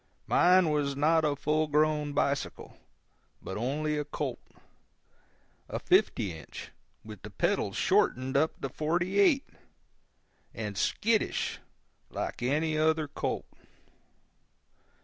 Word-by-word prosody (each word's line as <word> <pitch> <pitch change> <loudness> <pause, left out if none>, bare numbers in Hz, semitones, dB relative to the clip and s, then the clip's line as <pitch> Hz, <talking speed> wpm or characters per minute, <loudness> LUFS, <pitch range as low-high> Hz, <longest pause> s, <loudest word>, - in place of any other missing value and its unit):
Mine 180 -2 +4
was 145 -2 0
not 160 +3 +3
a 150 -2 +1
full 155 +2 0
grown 150 0 +1
bicycle, 140 -1 -2 0.6
but 95 - -7
only 150 +6 -1
a - - -1
colt—a 150 - -10
fifty 95 -4 +2
inch, 80 -2 -10 0.3
with 110 -3 -10
the 105 - -9
pedals 100 - -1
shortened 130 +1 +1
up 155 +3 +1
to 135 - -3
forty 175 +7 -1
eight—and 195 - -3
skittish, 220 - 0 0.5
like - - -5
any 155 +5 0
other 155 -1 +2
colt. - - -3
150 Hz, 105 wpm, -29 LUFS, 135-160 Hz, 0.6 s, Mine